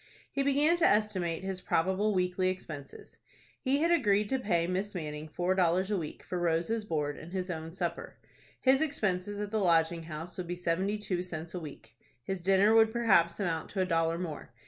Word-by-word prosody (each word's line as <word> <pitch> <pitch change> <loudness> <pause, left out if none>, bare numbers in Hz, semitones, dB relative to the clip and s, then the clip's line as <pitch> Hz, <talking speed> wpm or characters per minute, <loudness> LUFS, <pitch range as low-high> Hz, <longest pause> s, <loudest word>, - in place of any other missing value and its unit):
He 275 - -1
began 290 +5 +3
to 340 - 0
estimate 190 -6 +1
his 190 -1 -4
probable 190 +6 +1
weekly 180 0 +1
expenses. 155 -7 -8 0.4
He 280 +3 +1
had 335 - +3
agreed 210 -10 +3
to 265 - +1
pay 175 -8 +1
Miss 190 +3 -2
Manning 155 -2 -5
four 180 +4 0
dollars 185 +1 +2
a 205 - +2
week 155 -3 -7
for 180 - -4
Rose's 175 +6 0
board 150 -5 -2
and 165 - -10
his 185 -1 -3
own 160 -1 -5
supper. 170 -1 -4 0.4
His 265 +2 +4
expenses 205 -9 -1
at 205 -1 -4
the 220 - +1
Lodging 170 -3 +3
House 160 +2 -7
would 180 - -4
be 175 - -3
seventy 180 +4 0
two 190 -4 -2
cents 170 -2 -6
a 180 - -3
week. 140 -8 -11 0.3
His 190 +4 -4
dinner 195 +4 +4
would 225 0 +6
perhaps 190 -8 +3
amount 165 -5 -2
to 195 - -2
a - - +2
dollar 165 -1 +1
more. 165 -8 -6
185 Hz, 195 wpm, -30 LUFS, 165-210 Hz, 0.4 s, would